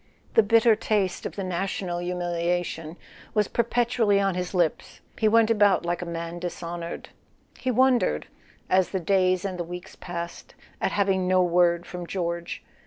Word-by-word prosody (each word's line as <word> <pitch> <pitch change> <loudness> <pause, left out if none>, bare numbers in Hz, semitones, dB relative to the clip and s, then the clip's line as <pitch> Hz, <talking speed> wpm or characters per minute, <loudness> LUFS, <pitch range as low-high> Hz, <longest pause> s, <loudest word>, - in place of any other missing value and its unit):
The - - +7
bitter 225 +1 +5
taste 205 -4 -1
of - - -10
the 195 - -3
national 185 -1 -2
humiliation 175 -2 -2 0.4
was 210 -2 +3
perpetually 235 -3 +2
on 195 -1 +1
his 180 +1 -4
lips: 175 -3 0 0.2
he 220 - +3
went 225 +1 +4
about 205 -5 +4
like 175 0 -1
a 175 - -5
man 170 0 -5
dishonoured. 170 -1 -6 0.5
He 260 - -2
wondered, 255 0 +3 0.4
as 185 -1 +3
the 190 - -2
days 185 +1 +2
and 185 -2 -4
the - - 0
weeks 175 +1 -8
passed, 170 -1 -7 0.3
at - - +1
having 190 -2 +1
no 185 0 +4
word 175 0 +3
from 180 -1 -7
George. 170 -2 -3
180 Hz, 160 wpm, -26 LUFS, 175-205 Hz, 0.5 s, The